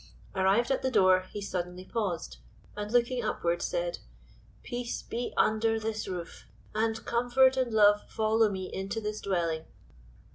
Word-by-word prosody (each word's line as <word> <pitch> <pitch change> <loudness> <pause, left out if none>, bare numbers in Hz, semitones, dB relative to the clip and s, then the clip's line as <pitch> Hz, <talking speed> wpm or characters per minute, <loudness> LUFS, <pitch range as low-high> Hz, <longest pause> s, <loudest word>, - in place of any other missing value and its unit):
Arrived 195 +7 +2
at 270 - +1
the 260 - +1
door, 185 -5 +4
he 210 - -5
suddenly 180 -2 -4
paused, 180 - -3 0.4
and 210 0 -4
looking 245 +1 +2
upward, 175 -5 -1
said: - - -2 0.6
"Peace 240 -1 -4
be 240 +1 -4
under 225 +1 +2
this 220 0 -3
roof, 180 -3 -6 0.3
and 225 +1 -1
comfort 245 +2 +3
and 255 -2 0
love 210 -1 +4
follow 220 0 +2
me 190 -2 -4
into 195 +3 -3
this 210 0 -4
dwelling." 170 -4 -1
215 Hz, 145 wpm, -29 LUFS, 190-235 Hz, 0.6 s, door